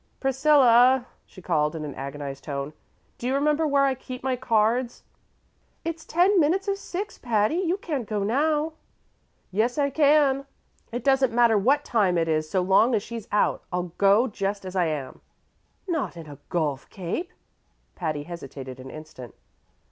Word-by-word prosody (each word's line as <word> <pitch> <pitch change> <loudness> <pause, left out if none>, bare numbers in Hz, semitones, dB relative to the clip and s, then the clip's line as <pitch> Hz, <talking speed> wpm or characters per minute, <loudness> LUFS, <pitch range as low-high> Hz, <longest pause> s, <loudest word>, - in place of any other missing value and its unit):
"Priscilla," 265 -2 +5 0.2
she 185 - -15
called 150 -3 +1
in 155 -1 -4
an 145 - -6
agonized 140 0 -6
tone, 140 0 -4 0.5
"do 240 - -3
you 260 - +1
remember 300 +2 +2
where 280 -1 +3
I 270 - +2
keep 255 0 -9
my 260 -1 0
cards?" 235 0 0 0.8
"It's 330 -1 -4
ten 365 +4 +3
minutes 355 +6 +2
of 395 0 0
six, 400 +2 -6
Patty; 225 +4 +1
you 365 0 0
can't 290 - -4
go 210 -2 -1
now." 300 +7 +1 0.8
"Yes, 225 +7 0
I 280 -1 +1
can. 280 -2 +3 0.4
It 240 0 -4
doesn't 270 -2 +3
matter 235 -1 +4
what 270 +9 +2
time 200 -7 +2
it 165 -1 +1
is, 155 -1 0
so 185 - +1
long 205 +6 +4
as 205 - 0
she's 230 -2 -7
out. 205 - +1
I'll 180 -1 -3
go 200 +5 +5
just 200 -2 -3
as 185 0 -7
I 180 -2 +2
am." 150 -4 -5 0.7
"Not 320 - -2
in 165 - -8
a 145 -2 -11
golf 150 -6 -2
cape!" 195 - -4 0.6
Patty 155 -4 -3
hesitated 135 -6 -8
an 130 +1 -9
instant. 155 -7 -11
230 Hz, 165 wpm, -25 LUFS, 170-280 Hz, 0.8 s, Priscilla